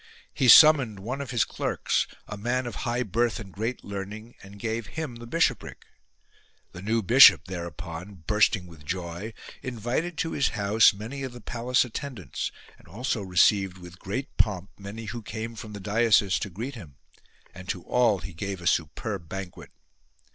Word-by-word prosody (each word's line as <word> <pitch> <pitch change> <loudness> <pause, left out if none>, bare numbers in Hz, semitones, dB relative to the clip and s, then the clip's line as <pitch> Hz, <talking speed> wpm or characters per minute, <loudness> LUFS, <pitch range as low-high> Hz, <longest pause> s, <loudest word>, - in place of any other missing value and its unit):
He 130 - +1
summoned 135 -5 +8
one 125 +8 -4
of 140 - -6
his 120 -3 +2
clerks, - - -1 0.2
a 105 - -6
man 120 +5 -1
of 120 - -5 0.2
high 120 +1 0
birth 115 +2 0
and 95 -4 -10
great 115 +5 -3
learning, 100 +4 -7
and 100 +1 -13
gave 110 +1 -3
him 150 -7 -4
the 120 0 -10
bishopric. 140 -5 -1 0.9
The 90 - -9
new 110 +3 0
bishop, 125 +7 +8
thereupon, 85 0 -7
bursting 105 -2 +2
with 80 -4 -14
joy, 85 +5 -5 0.3
invited 130 +8 -3
to 165 0 -1
his 140 - +1
house 105 +2 +5
many 115 +7 -7
of 130 -2 -5
the 120 - -10
palace 120 +3 0
attendants, 125 -3 -5 0.3
and - - -20
also 115 - -2
received 95 0 +3
with 90 0 -12
great 130 +8 -5
pomp 100 -3 0
many 100 +3 -8
who 115 +3 -5
came 110 +2 -6
from 110 -1 -9
the 100 - -7
diocese 105 -1 +3
to - - -4
greet 115 +10 -6
him: 85 - -11 0.6
and 90 +1 -11
to 90 - -3
all 120 -5 +3
he 95 -1 -9
gave 95 +3 -4
a 85 - -10
superb 85 +2 -1
banquet. 95 -2 -7
105 Hz, 170 wpm, -26 LUFS, 95-120 Hz, 0.9 s, summoned